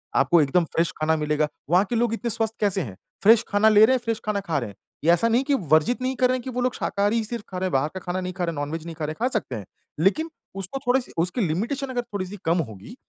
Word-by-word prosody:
आपको 150 +5 +4
एकदम 160 +5 +2
फ़्रेश 165 +1 0
खाना 155 +1 +2
मिलेगा। 150 0 0 0.2
वहाँ 180 +4 +4
के 240 - -1
लोग 230 0 +1
इतने 235 +1 -2
स्वस्थ 225 0 +1
कैसे 200 -2 +1
हैं? 100 - -7 0.3
फ़्रेश 225 +2 +7
खाना 210 +1 +4
ले 215 0 +7
रहे 260 - +3
हैं, - - 0
फ़्रेश 230 -1 -1
खाना 210 -1 0
खा 165 -7 -1
रहे 120 - -5
हैं। 100 - -13 0.3
ये 160 - +2
ऐसा 175 +7 +3
नहीं 240 +3 +3
कि 285 - +1 0.2
वर्जित 160 +12 +3
नहीं 260 +1 -1
कर 255 0 +3
रहे 255 - +1
हैं 250 - -8
कि 260 - -5
वो 250 0 -2
लोग 250 0 +1
शाकाहारी 205 +2 0
ही 225 - 0
सिर्फ़ 230 0 -4
खा 185 - -6
रहे 185 +1 -1
हैं, 185 - -4
बाहर 135 +3 +2
का 185 - -5
खाना 180 +1 -3
नहीं 185 0 -4
खा 180 0 -3
रहे 170 - -1
हैं, - - -4
नॉन-वेज 155 +3 -4
नहीं 165 - -7
खा 155 - -3
रहे 150 - -3
हैं, - - -7
खा 250 - +3
सकते 215 - -2
हैं। 105 -3 -6 0.3
लेकिन 305 - +2 0.3
उसको 195 +7 -4
थोड़ी-सी 250 0 +1
उसकी 180 +8 -1
लिमिटेशन 225 - -1
अगर 250 -1 -1
थोड़ी-सी 205 -3 -6
कम 165 +2 +2
होगी 105 - -11
195 Hz, 295 wpm, -24 LUFS, 160-235 Hz, 0.3 s, फ़्रेश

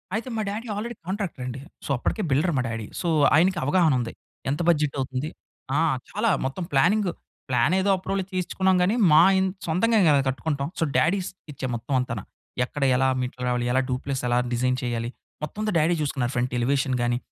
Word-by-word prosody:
అయితే 235 +3 -3
మా 220 - -1
daddy 225 +4 -5
already 235 +3 -4
కాంట్రాక్టరండి. 150 - -4 0.3
So, - - -7
అప్పడికే 215 - -2
builder 155 +5 +2
మా - - +2
డ్యాడీ. 115 -2 -4 0.2
సో, 175 - -2 0.3
ఆయనకి 175 +2 +3
అవగాహనుంది. 145 -8 +2 0.4
ఎంత 145 +5 -1
బడ్జెటవుతుంది 140 -2 0 0.5
ఆ! - - +3 0.3
చాలా 215 +2 0 0.2
మొత్తం 140 +7 -3
ప్లానింగు, 180 +7 +3 0.4
ప్లానేదో 175 +11 +2
అప్రూవల్‌ 190 +1 -2
తీయించుకున్నాం 185 +1 +1
గానీ, 205 +6 +2 0.2
మా 155 +2 +8 0.2
ఇన్ 190 0 +2 0.2
సొంతంగా 215 +7 +2
గదా! 145 -2 +5
కట్టుకుంటాం. 140 +1 -2
సో, - - +2
డ్యాడీ 185 +5 +3
స్కెచ్చే 150 -8 -7
మొత్తం 120 +4 -4
అంతాన. 115 -5 -3 0.4
ఎక్కడ 140 +2 -4
ఎలా 130 +1 +3
మెట్లు 125 0 -5
రావాలి? 120 -1 0
ఎలా 130 +1 +3
డూప్‌లెస్సెలా 125 -1 -1 0.2
డిజైన్ 125 +1 +1
చేయాలి? 120 -1 -2 0.3
మొత్తం 155 +8 -5
అంతా 215 -3 0
డ్యాడీ 165 +3 +3
చూసుకున్నారు. 130 -4 -1
ఫ్రంట్ 125 0 0
ఎలివేషన్ 135 +1 +1
గాని, 120 0 +1
145 Hz, 165 wpm, -25 LUFS, 125-185 Hz, 0.5 s, మా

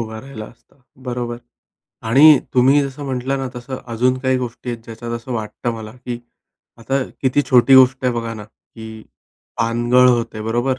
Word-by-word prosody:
उभा 110 -1 -5
राहिला 130 -5 -9
असता, 115 +1 -21 0.2
बरोबर 120 -2 -5 0.7
आणि 145 +4 +7 0.2
तुम्ही 130 +3 +5
जसं 140 +1 -6
म्हटलं 135 0 -2
ना, 135 -1 -3
तसं 130 +2 -6 0.2
अजून 125 +3 +1
काही 130 0 0
गोष्टी 125 0 -5
आहेत, 115 -1 -6
ज्याच्यात 115 +1 -8
असं 120 +2 -5
वाटतं 115 +1 -4
मला, 110 -1 -8
की 125 -1 -7 0.6
आता 135 +4 -1 0.2
किती 135 +2 +2
छोटी 130 +1 +6
गोष्ट 130 0 +5
आहे 125 - +2
बघा 115 -1 -4
ना, 105 -1 -9
की 110 0 -13 0.6
पानगळ 120 +2 +3
होते, 115 -3 0
बरोबर, 120 +4 -1
125 Hz, 165 wpm, -19 LUFS, 115-130 Hz, 0.7 s, आणि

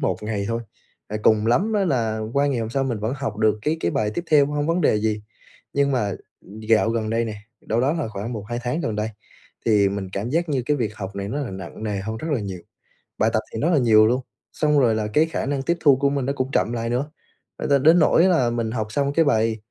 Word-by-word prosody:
1 95 - 0
ngày 105 -2 -2
thôi, 115 0 -1 0.6
cùng 110 0 +4
lắm 190 - +2
á, 205 -2 +2
là 115 -8 0
qua 140 +2 +2
ngày 135 -4 0
hôm 110 0 -3
sau 135 +2 0
mình 120 -4 -2
vẫn 110 +5 -2
học 125 -6 -4
được 110 0 +2
cái 155 +2 0
cái 85 - 0
bài 105 +3 0
tiếp 175 - -3
theo, 145 -2 +6
không 150 - -5
có - - +3
vấn 180 - 0
đề 105 - +3
gì. 105 0 -1 0.5
Nhưng 140 0 +2
mà 105 -6 0 0.6
dạo 110 0 +4
gần 110 -2 -1
đây 115 +1 +1
nè, 110 -2 -5 0.2
đâu 115 +2 -1
đó 140 +4 +2
là 160 -8 -2
khoảng 105 +3 -5
một 110 -4 -5
hai 120 0 -2
tháng 125 +7 -2
gần 110 -9 -2
đây, 105 +1 -1 0.6
thì 105 -3 +4
mình 100 -1 -4
cảm 105 +5 -3
giác 170 +3 0
như 135 -4 0
cái 150 - +2
việc 110 -5 -2
học 100 -2 -6
này 100 0 -4
nó 145 +6 -3
là 135 - -4
nặng 95 +2 -8
nề 105 -2 -2
hơn 110 +3 -4
rất 140 +9 -5
là 130 - 0
nhiều, 95 -3 -5 0.6
bài 110 - +3
tập 110 - +3
thì 110 - -3
rất 160 - +2
là 170 - +3
nhiều 110 -3 +5
luôn. 125 +3 +1 0.3
Xong 150 -1 +2
rồi 120 -5 +3
là 110 -1 -1
cái 150 +9 +3
khả 165 - -3
năng 140 0 -1
tiếp 170 +4 0
thu 140 -3 +6
của 140 +1 +2
mình 140 -2 -1
nó 140 - 0
cũng 130 -1 -3
chậm 120 - +1
lại 115 0 -2
nữa, 135 +5 -2 0.5
ờ, - - -3
đ 145 - +2
đến 165 +3 +6
nỗi 160 +2 +4
là 165 -10 +3
mình 115 -1 -2
học 110 -3 -2
xong 140 +3 0
cái 165 +2 +3
bài 110 -4 +2
115 Hz, 270 wpm, -23 LUFS, 110-140 Hz, 0.6 s, theo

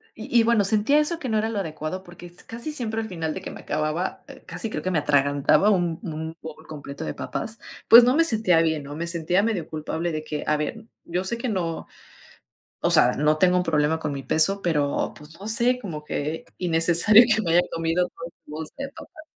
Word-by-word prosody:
Y 235 +1 0
y, - - +2
bueno, 230 -2 +3
sentía 220 +8 +3
eso 315 +3 +1
que 260 -7 -5
no 220 - +1
era 220 +1 0
lo 215 -3 -3
adecuado, 160 +1 -5
porque 175 0 -13
s 175 0 -13
casi 235 +7 -6
siempre 225 -5 -3
al 220 - -6
final 165 -5 -4
de - - -7
que - - -7
me - - -10
acababa 155 +4 -3 0.2
casi 180 +5 -6
creo - - -4
que 185 - -1
me 170 - +1
atragantaba 145 +5 +2
un 175 -5 0
un 160 -1 -6
bowl 160 0 -11
completo 145 0 -8
de - - -4
papas, 225 0 -6 0.3
pues, 235 +1 +10
no 250 +3 +3
me 330 - +4
sentía 215 - +3
bien, 160 -2 -1
¿no? 145 +1 -8
Me 170 +2 -4
sentía 170 +3 +1
medio 210 -8 -2
culpable 160 +2 -4
de 155 -1 -4
que, 150 -1 -5
a 150 - +1
ver, 220 +9 -5 0.2
yo 180 +2 -2
sé 230 +5 -3
que 245 +1 -3
no, 170 -6 -3 0.9
o - - +1
sea, - - +5
no 150 +1 +1
tengo 180 +2 +3
un 180 - +1
problema 155 -1 +1
con 150 -2 -4
mi 140 - -5
peso, 195 +8 +3
pero, 150 -4 0
pues, 150 +3 -15
no 200 - -9
sé, 240 +3 +1
como 160 -10 -7
que 150 +2 -4
innecesario 175 +6 +6
que 220 - -1
me 170 -4 -1
haya 175 - +6
comido 165 +2 0
toda 165 - -11 0.2
una 150 - -9
bolsa 160 -1 -8
de 275 0 -4
papas. 310 +2 -13
170 Hz, 230 wpm, -24 LUFS, 155-215 Hz, 0.9 s, pues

